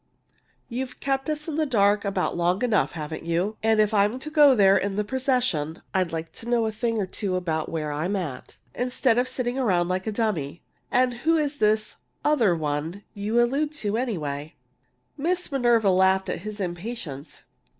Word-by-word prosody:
"You've 250 +1 -5
kept 270 +2 -1
us 305 +1 -2
in 315 -2 -3
the 315 - +2
dark 205 -4 +3
about 195 -2 -1
long 175 +5 +1
enough, 230 -4 +2
haven't 160 -1 -6
you? 175 +6 -1
And 220 0 +3
if 215 0 +3
I'm 205 +3 +3
to 305 +4 -7
go 295 -3 +7
in - - -1
there 195 -1 +6
with 200 0 -2
the 210 - 0
procession, 250 - -1
I'd 185 -3 +1
like 165 0 -4
to 235 - -9
know 235 -2 +2
a 220 - -1
thing 230 +1 -1
or 205 - 0
two 185 0 -3
about 160 -4 -2
where 155 -2 -3
I'm 160 +7 -1
at, 155 -10 -5 0.2
instead 250 -1 +1
of 250 - +1
sitting 255 0 -2
around 180 -8 +2
like 185 +3 -2
a - - 0
dummy! 185 -9 -2 0.3
And 250 0 +2
who 325 +6 +2
is 295 -2 -1
this 215 -1 +1 0.3
'other 240 - +3
one' 155 +5 -3
you 210 +3 0
allude 275 +5 +1
to, 215 -8 -2
anyway?" 155 - -3 0.6
Miss 355 +3 -1
Minerva 240 -6 +3
laughed 190 +1 +3
at - - -2
his 210 +3 -7
impatience. 175 - -6
210 Hz, 190 wpm, -25 LUFS, 175-250 Hz, 0.6 s, go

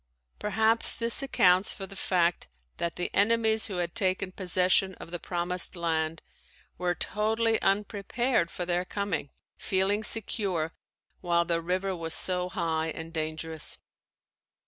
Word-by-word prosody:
Perhaps 220 +2 +1
this 230 +2 +1
accounts 185 -8 +3
for 195 - -6
the 195 - -12
fact 175 -2 0 0.3
that 170 0 -3
the 175 - -3
enemies 220 +1 +2
who 200 - -5
had 175 -1 -2
taken 185 0 -1
possession 185 0 +1
of 170 - -11
the 175 - -4
Promised 180 +1 -2
Land 165 -1 -2 0.6
were 175 -1 0
totally 220 +1 0
unprepared 205 +1 0
for 175 - -5
their 175 0 0
coming, 190 -6 -3 0.3
feeling 195 +2 +1
secure 195 -7 +1 0.5
while 170 -1 +1
the 170 -1 0
river 185 +3 -1
was 165 -1 +3
so 180 -1 +6
high 165 -2 -1
and 160 +1 -7
dangerous. 160 0 -2
180 Hz, 135 wpm, -28 LUFS, 170-205 Hz, 0.6 s, so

